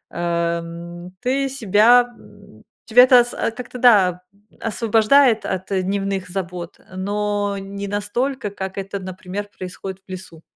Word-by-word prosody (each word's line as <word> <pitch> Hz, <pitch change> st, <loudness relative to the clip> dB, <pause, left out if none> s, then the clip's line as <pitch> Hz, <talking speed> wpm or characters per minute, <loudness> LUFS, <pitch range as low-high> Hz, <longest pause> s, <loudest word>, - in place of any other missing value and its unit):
а, 170 Hz, 0 st, 0 dB
м, 170 Hz, +2 st, -9 dB
ты 270 Hz, +2 st, 0 dB
себя, 240 Hz, -1 st, +5 dB
м, 200 Hz, -, -18 dB, 0.2 s
тебя 240 Hz, +2 st, +7 dB
это 250 Hz, -2 st, +7 dB
с 240 Hz, -, -8 dB, 0.3 s
как-то, 250 Hz, 0 st, -7 dB
да, 190 Hz, -7 st, +5 dB
м, 205 Hz, +2 st, -29 dB
освобождает 225 Hz, +2 st, +3 dB
от, 190 Hz, +2 st, -4 dB
э, 190 Hz, -1 st, +1 dB
дневных 195 Hz, -1 st, -2 dB
забот, 180 Hz, -2 st, -5 dB, 0.2 s
но 205 Hz, +1 st, -1 dB
не 200 Hz, +1 st, -6 dB
настолько, 210 Hz, +3 st, -2 dB
как 190 Hz, -1 st, -6 dB
это, 195 Hz, 0 st, -4 dB
например, 190 Hz, +2 st, -6 dB
происходит 185 Hz, +1 st, -7 dB
в -, -, -11 dB
лесу. 175 Hz, -3 st, -9 dB
200 Hz, 140 wpm, -21 LUFS, 185-220 Hz, 0.3 s, тебя